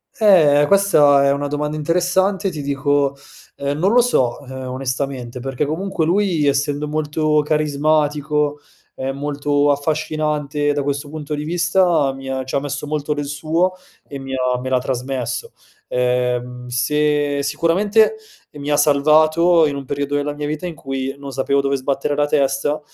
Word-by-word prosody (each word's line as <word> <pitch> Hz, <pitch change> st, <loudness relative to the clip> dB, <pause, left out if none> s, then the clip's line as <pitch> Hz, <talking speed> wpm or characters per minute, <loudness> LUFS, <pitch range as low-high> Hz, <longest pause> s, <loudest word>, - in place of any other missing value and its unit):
Eh, 155 Hz, -9 st, +5 dB
questa 150 Hz, -8 st, +5 dB
è 140 Hz, -, +4 dB
una 140 Hz, +1 st, -1 dB
domanda 150 Hz, +1 st, -2 dB
interessante. 180 Hz, +5 st, +1 dB
Ti 155 Hz, -4 st, -6 dB
dico, 140 Hz, 0 st, 0 dB, 0.4 s
ehm, 140 Hz, +1 st, -3 dB
non 190 Hz, +5 st, +2 dB
lo 245 Hz, -, +6 dB
so, 130 Hz, -, +1 dB
ehm, 130 Hz, 0 st, -7 dB
onestamente 130 Hz, -1 st, -4 dB
perché 135 Hz, +3 st, -2 dB
comunque 165 Hz, +3 st, -2 dB
lui 175 Hz, -3 st, +1 dB
essendo 145 Hz, +1 st, 0 dB
molto 150 Hz, 0 st, 0 dB
carismatico, 150 Hz, 0 st, 0 dB, 0.3 s
ehm, 135 Hz, +1 st, -4 dB
molto 145 Hz, 0 st, +1 dB
affascinante 150 Hz, 0 st, -1 dB
da 145 Hz, -1 st, -1 dB
questo 140 Hz, +1 st, -3 dB
punto 150 Hz, -1 st, -6 dB
di 150 Hz, 0 st, -3 dB
vista, 175 Hz, -3 st, +2 dB
mi 135 Hz, 0 st, -8 dB
ha 130 Hz, 0 st, -2 dB
ci 130 Hz, -, -9 dB
ha -, -, +3 dB
messo 145 Hz, +1 st, -5 dB
molto 150 Hz, 0 st, -2 dB
del 145 Hz, 0 st, -3 dB
suo 160 Hz, +5 st, 0 dB, 0.4 s
e 140 Hz, -, -7 dB
mi 135 Hz, 0 st, -7 dB
ha 125 Hz, -1 st, 0 dB
me 130 Hz, +1 st, -5 dB
l'ha 130 Hz, -, +2 dB
trasmesso. 125 Hz, 0 st, -4 dB, 0.3 s
Ehm, 125 Hz, 0 st, -1 dB
se 145 Hz, +3 st, 0 dB
sicuramente, 170 Hz, -, +2 dB, 0.4 s
ehm, 145 Hz, -, -10 dB
mi 145 Hz, -, -4 dB
ha 145 Hz, -, +2 dB
salvato 155 Hz, +3 st, +4 dB
in 145 Hz, -2 st, -1 dB
un 140 Hz, -1 st, -6 dB
periodo 140 Hz, +2 st, -3 dB
della 145 Hz, 0 st, -1 dB
mia 150 Hz, 0 st, -4 dB
vita 155 Hz, +4 st, -4 dB
in 170 Hz, -, -7 dB
cui 135 Hz, -2 st, -4 dB
non 140 Hz, -1 st, -8 dB
sapevo 135 Hz, +1 st, 0 dB
dove 140 Hz, 0 st, 0 dB
sbattere 140 Hz, +2 st, -1 dB
la 145 Hz, 0 st, +1 dB
testa, 140 Hz, +1 st, 0 dB
145 Hz, 165 wpm, -19 LUFS, 135-155 Hz, 0.4 s, lo